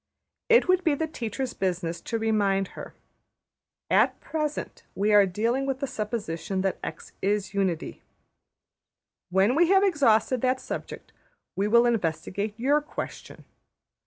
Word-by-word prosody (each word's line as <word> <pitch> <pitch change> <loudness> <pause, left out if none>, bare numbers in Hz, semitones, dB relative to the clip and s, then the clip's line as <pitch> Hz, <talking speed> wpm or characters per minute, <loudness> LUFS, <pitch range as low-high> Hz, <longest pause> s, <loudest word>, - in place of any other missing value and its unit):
It 470 -3 +5
would 370 0 +3
be 310 -3 +2
the 320 - -1
teacher's 255 -4 -4
business 175 -3 -2
to 230 - -3
remind 205 -4 +1
her: - - -10 1.0
``At - - +3
present 305 -2 -4
we 210 +2 +1
are 205 -1 +6
dealing 230 +8 -1
with 270 -1 -2
the 280 - -1
supposition 205 -6 -3
that 190 0 -1
$x$ - - -7
\emph{is} 200 0 0
unity. 190 -5 -2 1.3
When 190 +6 +3
we 335 +4 +4
have 390 0 +5
exhausted 255 - +3
that 255 0 +1
subject - - -7 0.4
we 200 +2 0
will 235 +3 +5
investigate 205 0 -1
your 285 +5 +3
question. 295 - -8
220 Hz, 135 wpm, -26 LUFS, 195-270 Hz, 1.3 s, are